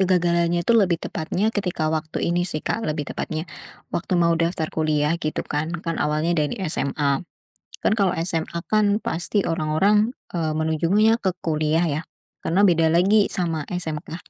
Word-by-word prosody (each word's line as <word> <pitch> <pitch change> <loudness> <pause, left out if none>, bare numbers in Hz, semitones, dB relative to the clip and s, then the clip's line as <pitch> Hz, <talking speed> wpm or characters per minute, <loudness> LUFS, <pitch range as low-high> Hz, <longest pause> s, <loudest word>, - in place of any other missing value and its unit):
Kegagalannya 175 -2 +2
itu - - +3
lebih 195 -7 +4
tepatnya 190 +7 -2
ketika 180 -6 -1
waktu 155 0 -2
ini 175 - +1
sih, 155 -3 -4
Kak, 225 - -1
lebih 150 -1 -2
tepatnya. 155 +1 -4 0.5
Waktu 180 +1 -1
mau 170 -1 +3
daftar 165 -1 0
kuliah 155 -1 +1
gitu 155 -1 -2
kan. 150 +2 -2 0.2
Kan 165 -1 -2
awalnya 155 +3 +1
dari 150 +8 -1 0.2
SMA, 140 0 0 0.6
kan - - +2
kalau 195 -3 +2
SMA, 165 0 -2
kan 210 -1 +3
pasti 180 +5 0
orang-orang, 190 +8 +2 0.2
eee, 160 -3 0
menujunya 165 +8 +2
ke 190 -4 0
kuliah 155 +1 +1
ya. 150 +1 -2 0.4
Karena 185 +5 +2
beda 165 -2 +3
lagi 200 +5 +4
sama 165 -4 -1
SMK. 165 -1 -5
165 Hz, 155 wpm, -23 LUFS, 155-185 Hz, 0.6 s, lebih